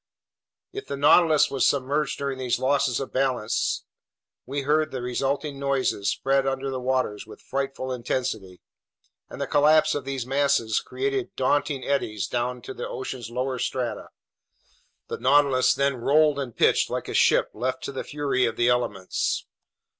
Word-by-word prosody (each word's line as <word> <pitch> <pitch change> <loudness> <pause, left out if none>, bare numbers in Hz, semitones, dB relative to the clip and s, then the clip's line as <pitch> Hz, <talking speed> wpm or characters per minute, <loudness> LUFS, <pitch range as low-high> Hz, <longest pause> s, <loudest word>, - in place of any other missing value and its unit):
If 410 - -7
the 140 - -4
Nautilus 155 +2 +5
was 135 -2 0
submerged 140 +2 +1
during 140 -2 -3
these 125 -2 0
losses 130 -1 +1
of 135 - -6
balance, 130 -4 0 0.6
we 140 +2 -3
heard 155 +2 +2
the 130 - -5
resulting 135 +3 -2
noises 135 -7 0
spread 135 0 +1
under 135 0 -2
the 130 - -3
waters 125 -5 -1
with 110 - -12
frightful 135 -1 -4
intensity, 115 -7 -3 0.7
and - - -9
the - - -1
collapse 155 +2 +4
of 145 - -3
these 135 -2 -4
masses 135 -5 +1
created 405 -2 -3
daunting 135 +1 0
eddies 105 -8 -1
down 125 0 -2
to - - -7
the - - -5
ocean's 130 -3 -6
lower 125 +1 -2
strata. 125 -1 -3 1.0
The - - -5
Nautilus 135 0 +4
then 140 -1 +1
rolled 145 +4 +3
and 130 -5 -5
pitched - - +3
like - - -3
a - - -5
ship - - +3
left 125 +4 -3
to - - -4
the 135 - -5
fury 140 -3 0
of 115 -1 -1
the 120 +1 +2
elements. 105 -6 -1
135 Hz, 160 wpm, -25 LUFS, 125-140 Hz, 1.0 s, Nautilus